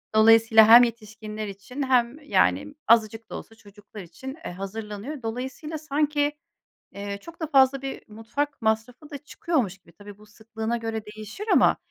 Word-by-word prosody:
Dolayısıyla 225 0 +6
hem 235 +2 +10
yetişkinler 215 -2 -5
için 205 +8 -6
hem, 255 +1 +1
yani, 295 0 +1
azıcık 225 0 +2
da - - -7
olsa 225 - -10
çocuklar 205 0 -13
için, 260 - -9
eee, - - -4
hazırlanıyor. 210 +8 -7
Dolayısıyla 260 +7 -5
sanki, 295 -1 0 0.6
eee, 200 0 -6
çok 335 +9 -13
da 320 - -2
fazla 270 -2 +3
bir 270 0 -6
mutfak 235 +7 -4
masrafı 225 +7 -2
da 285 - -6
çıkıyormuş 275 - -2
gibi, 170 -2 -22
tabii 205 +3 -13
bu 210 - -17
sıklığına 220 +2 -5
göre 225 -2 -4
değişir 215 - -9
ama - - +5
225 Hz, 155 wpm, -25 LUFS, 215-275 Hz, 0.6 s, hem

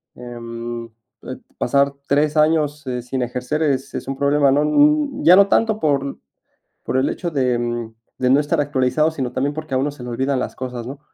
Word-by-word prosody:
Em, 120 -1 -7 0.4
eh, - - -7 0.2
pasar 140 0 +2
3 150 +2 +2
años, 150 -1 +2
eh, 125 -1 -2
sin 125 +2 -4
ejercer 125 +5 -2
es 135 -3 -1
es - - -5
un 135 - -3
problema, 140 0 +3
¿no? 145 +2 +3
n 290 - +2
ya 180 - +8
no 200 0 +6
tanto 220 0 +2
por 140 -4 0 0.7
por 130 - -1
el 130 - +2
hecho 175 - -3
de 130 -5 +1 0.6
de 125 - +1
no 135 - +5
estar 150 +2 -1
actualizado, 145 +2 +1
sino 130 -6 -4
también 140 +3 -1
porque 155 -3 -5
a - - +3
uno 140 +3 0
se 140 -3 -11
le 125 - -6
olvidan 130 +3 -1
las - - -4
cosas, 125 -2 -6
¿no? 135 +2 -8
140 Hz, 200 wpm, -20 LUFS, 125-150 Hz, 0.7 s, ya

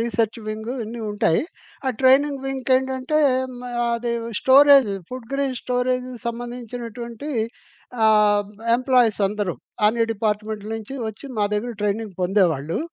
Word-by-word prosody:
Research 230 0 0
wing 220 +2 -4
ఇవన్నీ 230 +1 -6
ఉంటాయి. 205 -3 +2 0.4
ఆ 260 - +3
ట్రైనింగ్ 270 +1 +4
వింగ్ 265 -1 -4
ఏంటంటే, 265 +3 -1 0.4
మ్ 245 - -10 0.3
అది 235 0 -2 0.3
స్టోరేజ్, 275 -3 +7 0.2
ఫుడ్ 250 -2 -7
గ్రెన్ 275 -2 -1
స్టోరేజ్‌కి 250 0 -1
సంబంధించినటువంటి 240 +1 -6 0.7
ఆహ్, 210 -1 +4 0.3
ఎంప్లాయీస్ 250 -4 +2
అందరూ, 205 -3 -2 0.3
అన్ని 230 +2 +3
డిపార్ట్‌మెంట్‌లు 215 0 -2
నుంచి 225 +4 -8
ఒచ్చి 220 +6 -9
మా 205 - +3
దగ్గర 235 +4 -2
ట్రైనింగ్ 210 0 -1
పొందేవాళ్ళు. 175 -5 +1
235 Hz, 120 wpm, -22 LUFS, 210-255 Hz, 0.7 s, స్టోరేజ్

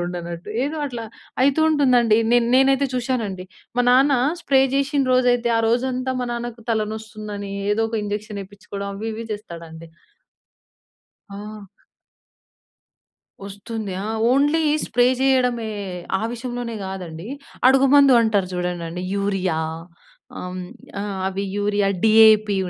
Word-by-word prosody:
ఉండనట్టు 175 0 -6 0.2
ఏదో 295 +3 -3
అట్లా 240 -4 -6 0.4
అయితూ 280 +3 +3
ఉంటుందండి. 250 -7 +4 0.2
నేన్ 240 -1 +3
నేనైతే 270 +1 +4
చూశానండి 230 -7 -2 0.3
మా 245 - +3
నాన్న 270 +3 +5 0.3
స్ప్రే 270 -5 +3
చేసిన 275 +1 +1
రోజైతే 245 -1 +3
ఆ - - +3
రోజంతా 255 +2 0
మా 250 - -1
నాన్నకు 235 -1 -6
తలనొస్తుందని 215 -2 -4 0.2
ఏదో 220 - 0
ఒక 225 - -6
ఇంజెక్షన్ 210 0 -4
ఏయిపించుకోడం 200 0 -8
అవి 215 +3 -6
ఇవి 225 +1 -6
చేస్తాడండి. 165 -5 -9 1.4
ఆ! 210 +2 -8 1.9
వస్తుంది. 205 +1 -6
ఆ! - - -3 0.2
ఓన్లీ 290 +4 +3 0.2
స్ప్రే 245 +1 +3 0.2
చేయడమే, 250 -4 +2 0.5
ఆ - - -4
విషయంలోనే 240 -1 -5
కాదండి 180 -1 -7 0.4
అడుగు 270 +1 +5
మందు 275 -4 +7
అంటారు 205 -4 +1
చూడండండి, 180 -1 -3
యూరియా 195 -4 -1 0.8
ఆహ్, 180 0 -6 0.4
ఆహ్, 200 -1 -4
అవి 195 +1 -2
యూరియా 205 0 +1 0.2
డీఏపీ 215 -2 +6
220 Hz, 115 wpm, -22 LUFS, 200-250 Hz, 1.9 s, మందు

